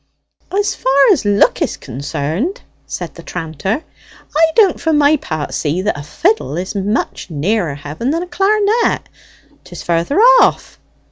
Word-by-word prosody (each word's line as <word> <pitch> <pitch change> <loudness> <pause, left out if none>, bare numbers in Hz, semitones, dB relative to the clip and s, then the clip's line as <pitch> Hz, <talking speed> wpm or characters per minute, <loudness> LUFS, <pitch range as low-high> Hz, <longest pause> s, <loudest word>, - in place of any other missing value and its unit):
"As 405 +2 0
far 275 +1 +3
as 300 - +1
look 205 0 +3
is - - -1
concerned," 145 - -4 0.3
said - - -6
the - - -11
tranter, 165 - -4 0.5
"I 325 +2 +6
don't 405 -6 +4
for 320 - +1
my 295 0 +4
part 155 - -5
see 165 +5 -1
that 210 - 0
a 145 - -6
fiddle 335 - -1
is 185 +2 -4
much 205 -1 -2
nearer 165 +1 -1
heaven 150 - -5
than 330 +4 0
a - - -5
clar'net. 420 +4 +1 0.6
'Tis - - -10
further 170 - 0
off. - - +4
220 Hz, 150 wpm, -16 LUFS, -, 0.6 s, I